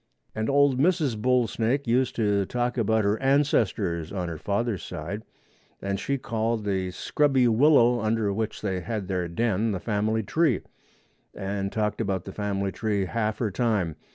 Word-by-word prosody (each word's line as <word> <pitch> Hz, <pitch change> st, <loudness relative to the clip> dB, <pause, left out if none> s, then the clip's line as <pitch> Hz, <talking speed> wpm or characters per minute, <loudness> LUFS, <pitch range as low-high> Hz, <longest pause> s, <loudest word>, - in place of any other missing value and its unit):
And 110 Hz, 0 st, -2 dB
old 140 Hz, -2 st, +3 dB
Mrs. 155 Hz, -5 st, +2 dB
Bull 125 Hz, +3 st, +2 dB
snake 120 Hz, +5 st, -1 dB
used 125 Hz, +2 st, +1 dB
to 100 Hz, -3 st, +1 dB
talk 125 Hz, 0 st, -1 dB
about 110 Hz, -2 st, +2 dB
her 100 Hz, +2 st, 0 dB
ancestors 110 Hz, -, +1 dB
on 90 Hz, -3 st, -3 dB
her 80 Hz, -2 st, -6 dB
father's 105 Hz, +2 st, -1 dB
side, 90 Hz, +5 st, -5 dB, 0.6 s
and 100 Hz, 0 st, -2 dB
she 140 Hz, +6 st, -1 dB
called 115 Hz, -2 st, -2 dB
the 95 Hz, -2 st, -1 dB
scrubby 135 Hz, +6 st, +2 dB
willow 120 Hz, 0 st, +5 dB
under 110 Hz, -2 st, 0 dB
which 110 Hz, +1 st, -3 dB
they 95 Hz, -3 st, -1 dB
had 105 Hz, 0 st, -4 dB
their 90 Hz, -2 st, -1 dB
den 110 Hz, +3 st, 0 dB
the 95 Hz, -, -2 dB
family 110 Hz, +2 st, 0 dB
tree, 145 Hz, -, +1 dB, 0.7 s
and 100 Hz, 0 st, -3 dB
talked 105 Hz, 0 st, -1 dB
about 95 Hz, -4 st, -2 dB
the 95 Hz, -, -6 dB
family 100 Hz, -2 st, -2 dB
tree 105 Hz, -3 st, -1 dB
half 110 Hz, +1 st, -1 dB
her 110 Hz, -4 st, -1 dB
time. 100 Hz, -8 st, 0 dB
110 Hz, 165 wpm, -26 LUFS, 100-120 Hz, 0.7 s, willow